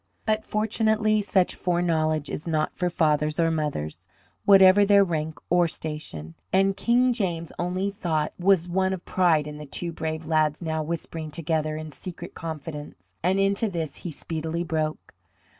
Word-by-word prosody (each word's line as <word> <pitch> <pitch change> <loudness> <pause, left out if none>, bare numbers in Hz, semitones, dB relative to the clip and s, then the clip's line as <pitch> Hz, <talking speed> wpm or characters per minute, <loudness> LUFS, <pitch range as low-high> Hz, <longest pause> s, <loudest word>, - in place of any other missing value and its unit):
But, 215 0 +1
fortunately, 215 0 +1
such 190 -2 +2
foreknowledge 160 -4 0
is 155 - -5
not 155 -1 0
for 180 -1 -1
fathers 150 -2 +1
or 165 -1 +3
mothers, 90 - -3 0.4
whatever 195 -1 +7
their 200 0 +6
rank 160 -3 -2
or 175 0 +3
station, 150 - -6 0.2
and 195 +1 +3
King 245 +5 +3
James's 170 -8 -2
only 185 +3 -1
thought 160 -7 -1
was 180 -2 +3
one 190 +2 +1
of 185 - -6
pride 170 -5 +3
in 150 0 -7
the 150 - -8
two 170 +4 -3
brave 160 0 -4
lads 155 -1 +1
now 160 -2 -2
whispering 160 0 -4
together 155 -1 -1
in 155 0 -7
secret 180 +3 -8
confidence. 150 - -7
And 185 +3 +2
into 200 +3 +2
this 165 -6 -4
he 175 - -6
speedily 160 +2 -3
broke. 155 -2 -3
165 Hz, 160 wpm, -25 LUFS, 155-190 Hz, 0.4 s, whatever